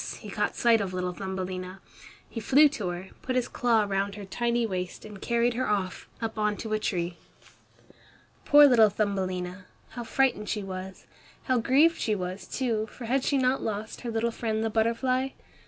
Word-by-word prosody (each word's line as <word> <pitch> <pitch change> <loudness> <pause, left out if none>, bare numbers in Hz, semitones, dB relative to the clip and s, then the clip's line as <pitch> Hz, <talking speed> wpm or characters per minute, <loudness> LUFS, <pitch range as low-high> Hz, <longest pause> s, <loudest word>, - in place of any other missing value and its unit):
he - - -8
caught - - -1
sight 230 -2 +4
of 185 -2 -3
little 180 0 -2
Thumbelina. 185 0 -5 0.5
He 230 - -6
flew 280 +6 +6
to 215 -9 -4
her, 175 +2 -6
put 255 - -3
his 250 -1 +1
claw 230 -3 +2
round 200 0 -1
her 205 -1 -7
tiny 235 +4 0
waist 185 -3 -4
and 210 -2 -10
carried 235 0 +1
her 255 +2 -1
off, 195 -3 -2
up 225 -1 -4
on 210 -1 +1
to 220 -1 -4
a 215 - +1
tree. 175 -4 -2 1.3
Poor 290 0 +8
little 230 -6 +6
Thumbelina! 185 -2 -2 0.2
How 240 - -6
frightened 235 -3 +1
she 210 -2 -2
was! 190 0 -7 0.4
How 255 -2 +2
grieved 285 +8 +4
she 215 - +1
was, 185 0 -5
too, 225 -4 -1
for 235 +2 -10
had 260 +3 +1
she 280 - +2
not 260 0 +2
lost 215 0 -4
her 240 - -4
little 230 +1 0
friend 220 -1 -2
the 225 - -1
butterfly? 255 +4 +1
220 Hz, 185 wpm, -27 LUFS, 190-240 Hz, 1.3 s, Poor